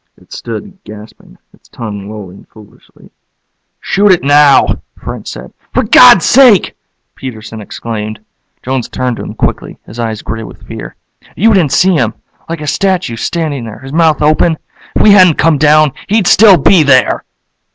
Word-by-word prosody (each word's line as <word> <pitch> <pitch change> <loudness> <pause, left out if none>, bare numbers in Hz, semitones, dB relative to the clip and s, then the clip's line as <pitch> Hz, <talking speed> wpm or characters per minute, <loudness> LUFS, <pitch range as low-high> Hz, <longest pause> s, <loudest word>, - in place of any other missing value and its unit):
It - - -17
stood, 190 - -8
gasping, 105 - -14 0.2
its - - -25
tongue 105 -3 -8
lolling 100 -3 -11
foolishly. 110 -2 -20 0.7
"Shoot 200 +1 +1
it 180 - +1
now," 145 0 +3 0.2
French - - -8
said. - - -9 0.2
"For - - +2
God's - - +6
sake!" 250 -8 +4 0.4
Peterson 110 -3 -9
exclaimed. 110 0 -7 0.4
Jones 130 -1 -3
turned 125 -2 -3
to - - -7
him - - -8
quickly, - - -3
his 115 - -12
eyes 110 -2 -4
gray 110 +1 -6
with 110 - -12
fear. - - -9 0.4
"You 225 +4 +2
didn't 170 -8 +1
see 190 0 +3
him 120 -9 -1 0.3
like 165 -2 -5
a - - -6
statue, 185 - -1
standing 145 +1 -4
there, 110 -2 -9
his 135 +1 -11
mouth 160 -2 +1
open. 155 +2 +1 0.4
If - - +1
we 210 - +6
hadn't 185 -5 +5
come 155 -2 +2
down, 155 0 +3 0.2
he'd 210 -1 0
still 200 0 +6
be 170 +4 +3
there." 130 -4 +2
145 Hz, 160 wpm, -11 LUFS, 110-175 Hz, 0.7 s, God's